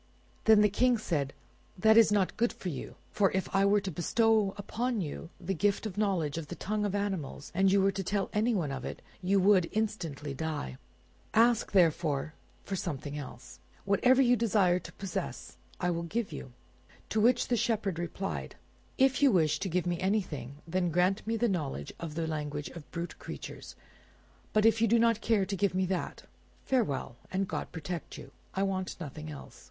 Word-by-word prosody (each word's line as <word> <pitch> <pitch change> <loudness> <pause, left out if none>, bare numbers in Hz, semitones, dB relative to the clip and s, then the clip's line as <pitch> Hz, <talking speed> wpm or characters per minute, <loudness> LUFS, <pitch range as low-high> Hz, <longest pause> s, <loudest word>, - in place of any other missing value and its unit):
Then 220 -1 +7
the 210 - +6
King 245 +4 +3
said, 150 -10 -1 0.5
"That 220 +4 +5
is 225 -2 +7
not 200 -3 +2
good 235 +1 +2
for 185 - -6
you; 140 -6 -6 0.2
for 195 -2 +3
if 190 0 0
I 195 0 +4
were 205 +1 +4
to 190 - -4
bestow 215 +4 +2
upon 235 +3 -2
you 165 -1 -5
the 190 +1 -2
gift 200 +4 +1
of 215 - -3
the 205 - -5
knowledge 170 -7 0
of 155 - -7
the 175 - -6
tongue 210 +3 -2
of 205 -1 -1
animals, 190 -9 -3
and 190 +2 +3
you 195 0 +4
were 195 - +4
to 195 0 -3
tell 200 +1 0
anyone 210 -8 +1
of 135 -2 -4
it, - - -6 0.2
you 195 +2 +3
would 185 -3 +4
instantly 170 -10 -2
die. 140 - -4 0.6
Ask, 230 0 +4
therefore, 160 -5 +2 0.3
for 195 - -3
something 145 -5 -4
else; 130 -3 -9 0.3
whatever 250 +7 +4
you 245 0 +5
desire 200 -6 +3
to - - -10
possess, 195 -2 -5 0.2
I 180 -1 +1
will 170 0 -1
give 205 +6 -2
to 150 - -7
you." 130 -3 -8 0.6
To 215 - +1
which 240 +4 +3
the 245 - +3
Shepherd 210 -6 0
replied— 180 +3 -4 0.4
"If 265 0 +3
you 280 -2 +6
wish 155 -6 +3
to 195 - -2
give 180 +1 0
me 175 -1 -1
anything, 175 - -1
then 180 +1 0
grant 180 +5 +1
me 225 0 0
the 240 +2 +2
knowledge 145 - -3
of 160 -3 -6
the 165 0 -1
language 150 -2 -3
of 165 -4 -11
brute 170 0 -5
creatures; - - -8 0.8
but 215 0 +3
if 225 0 +4
you 230 - +5
do 235 +2 +4
not 230 -1 +3
care 215 -4 +2
to 195 - -3
give 195 0 +1
me 185 0 +2
that—farewell, 180 - -3
and 195 +1 0
God - - -4
protect 170 +1 -6
you! - - -11 0.2
I 195 - +1
want 190 -1 -2
nothing 155 -1 -7
else." 145 -2 -10
190 Hz, 195 wpm, -30 LUFS, 165-215 Hz, 0.8 s, Then